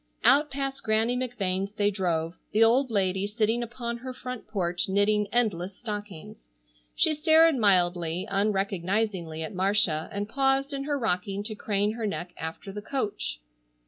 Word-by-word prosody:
Out 295 +2 +5
past 275 -1 -3
Granny 225 +2 +1
McVane's 200 -6 -2
they 205 -1 +1
drove, 170 -4 -1 0.2
the 220 +2 +5
old 250 +4 +4
lady 195 -2 0
sitting 220 +2 0
upon 235 0 -4
her 255 +1 -7
front 250 -2 -7
porch 180 -4 -1
knitting 205 +1 +2
endless 195 -6 0
stockings. 205 - -7 0.5
She 315 - +3
stared 315 +1 +5
mildly, 180 -5 +2
unrecognizingly 195 -3 -1
at 160 - -6
Marcia 185 -4 +1
and 200 0 -3
paused 270 +3 +1
in 275 0 -3
her 290 -1 0
rocking 200 -3 -1
to 215 +1 -4
crane 205 -1 0
her 225 -1 -3
neck 180 -3 -5
after 165 +5 -6
the 210 +1 -6
coach. 210 - -3
210 Hz, 150 wpm, -27 LUFS, 185-240 Hz, 0.5 s, Out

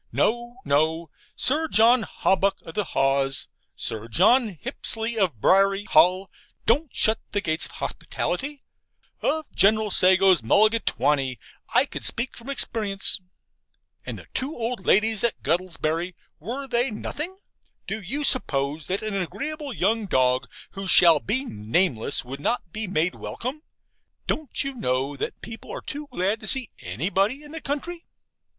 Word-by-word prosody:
No, 240 +1 0
no. 160 +3 0 0.2
Sir 310 +5 +1
John 235 -2 +5
Hawbuck 195 -1 +1
of 165 - -10
the 210 +2 -1
Haws, 135 -2 +1 0.3
Sir 110 +1 -2
John 205 - +3
Hipsley 235 -2 -2
of 185 - 0
Briary 195 - +3
Hall, 185 +2 +3 0.3
don't 285 +7 +2
shut 220 +1 +2
the 205 - +1
gates 160 -3 +2
of - - -17
hospitality: 285 0 -4 0.6
of 315 0 0
General 215 +1 +3
Sago's 185 -2 +5
mulligatawny 145 - +2 0.4
I - - +6
could - - -7
speak 240 +2 -1
from 235 +3 -9
experience. 210 -8 +1 0.8
And - - -6
the - - -12
two 270 +4 -2
old 230 -3 -4
ladies 220 +1 +4
at 235 - 0
Guttlebury, 170 +1 -1 0.2
were 250 - -5
they 245 +1 +1
nothing? 300 - -5 0.5
Do 220 - -4
you 270 +11 -3
suppose 145 - +1
that 190 +3 -2
an 215 -2 -3
agreeable 275 - -4
young 220 0 0
dog, 130 -4 +1 0.2
who 195 0 -6
shall 170 -4 +7
be 255 - -1
nameless, 115 - +1
would 135 +3 -7
not 200 -2 -2
be 215 +2 -3
made 180 -1 +1
welcome? 260 +6 -6 0.6
Don't 310 -5 -1
you 275 0 -4
know 135 - -1
that - - -5
people 225 0 -9
are - - -6
too 295 +1 -6
glad 205 -2 -1
to 215 - -8
see 260 -1 +2
ANYBODY 195 - -1
in 295 - -13
the 320 0 -7
country? 335 +5 -5
200 Hz, 145 wpm, -24 LUFS, 165-245 Hz, 0.8 s, shall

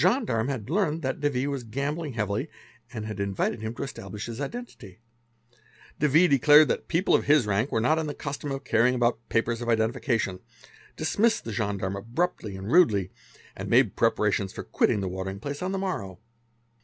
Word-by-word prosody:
The 175 - +5
gendarme 190 - 0
ha¢ 130 -7 -4
learned 165 -1 0
that 130 0 -2
de 145 0 +1
V. 130 -1 -1
was 140 -3 -3
gambling 140 +6 -3
heavily 105 -3 -2 0.4
and 110 - -5
had 105 -2 -6
invited 100 +3 -1
him 110 +1 -4
to - - -4
establisk 105 -6 -7
his 120 +3 -6
identity. 140 - -7 1.0
De 150 - +3
V. 160 +6 +5
declared 145 +1 +6
that - - -2
people 175 +3 +1
of - - +3
his 145 -4 +4
rank 105 +5 0
were - - +1
not 155 +8 +2
in 160 - -2
th 145 - -5
custom 145 0 -5
of 135 0 -4
carrying 115 +3 +3
about 120 -1 +1
papers 115 +1 0
of 120 - -3
identification, 110 -3 0 0.6
dismissed 225 +2 +1
the 115 - -5
gendarm 100 -3 -2
abruptly 115 - -2
and 95 +4 -6
rudely, 105 - +4 0.4
and - - -6
made - - +4
prepartions 100 -2 +1
for - - -7
quitting 105 - +1
the 95 - -2
watering 95 +1 -5
plac 140 - -5
on 185 +1 -2
the 195 - -1
morrow. 130 - -3
120 Hz, 190 wpm, -26 LUFS, 105-150 Hz, 1.0 s, declared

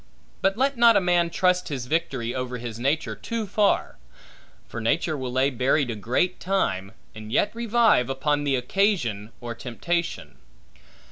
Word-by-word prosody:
But 195 +2 +1
let 270 +1 +1
not 235 -2 +6
a - - +6
man 175 -2 +2
trust 180 +1 +1
his 135 -6 -4
victory 125 -5 -1
over 125 -1 -3
his 115 -2 -7
nature, 135 -4 0
too 225 - -4
far; 205 +1 +1 0.7
for 115 - -6
nature 155 +7 0
will 130 -3 -4
lay 130 +2 +2
buried 130 +1 +1
a - - -4
great 125 - 0
time, 100 - -1 0.2
and 110 0 -9
yet 205 - +2
revive, 230 - +3
upon 145 +2 0
the 140 -2 +1
occasion 125 - 0
or 120 -1 -5
temptation. 165 +9 -4
140 Hz, 155 wpm, -25 LUFS, 120-185 Hz, 0.7 s, not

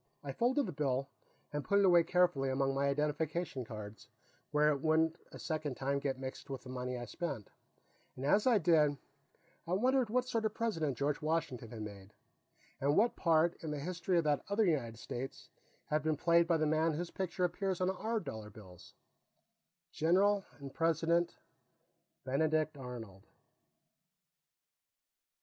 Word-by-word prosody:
I - - -4
folded 255 +4 +1
the - - -4
bill 135 -2 -1 0.4
and 145 -1 -2
put 200 - +2
it 200 - +5
away 175 -2 +7
carefully 175 -7 +2
among 135 +1 +1
my 140 +1 +1
identification 150 0 -1
cards, 110 -2 -9 0.4
where 150 0 +3
it 140 -2 0
wouldn't 160 +1 +2
a - - -9
second 155 -4 -3
time 140 +1 0
get 135 -2 -2
mixed 130 +1 -7
with 135 -2 -5
the 130 - -8
money 125 0 -3
I 120 - -5
spent, 140 - -5 0.6
and 130 - -5
as 205 - +3
I 240 -3 +6
did, 155 -5 +3 0.7
I 175 - -1
wondered 250 +4 +2
what 250 +3 +1
sort 230 -3 -1
of 215 -1 0
a - - -35
President 160 - -1
George 140 0 0
Washington 155 -7 -1
had 110 -2 -6
made, 100 -1 -10 0.6
and 140 +2 +2
what 230 +4 +4
part, 165 0 +3
in 160 - -3
the 150 - -2
history 175 +3 -1
of 170 - +3
that 150 -2 +1
other 210 +2 +3
United 125 - 0
States, 125 +3 -6 0.4
had 155 0 0
been 155 0 0
played 170 +2 +4
by 165 -1 +3
the 155 - +1
man 155 +1 +2
whose 170 +3 -4
picture 185 -1 -2
appears 185 +1 0
on 185 0 +2
our 220 +4 -2
dollar 110 - -7
bills 95 -4 -14 1.0
General 195 +6 +3
and 140 -2 -9
President 165 +1 +1 0.9
Benedict 155 +3 +1
Arnold. 120 -8 -9
155 Hz, 165 wpm, -34 LUFS, 135-175 Hz, 1.0 s, away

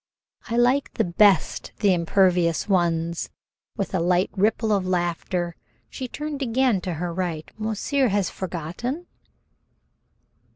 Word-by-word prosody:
"I 230 - 0
like 250 +3 +3 0.3
best 200 -6 +3
the 200 -3 +3
impervious 175 -1 +2
ones." 170 -3 0 0.5
With 200 -2 -3
a 185 - +1
light 180 +2 +2
ripple 215 +2 +1
of 200 -2 +2
laughter 175 -1 -1 0.4
she 260 - -5
turned 295 +2 -5
again 250 -5 +2
to 180 -2 -3
her 170 +2 -3
right. 170 -3 -3
"Monsieur 220 +5 0
has 200 -3 +1
forgotten?" 190 - -4
190 Hz, 120 wpm, -24 LUFS, 175-225 Hz, 0.5 s, like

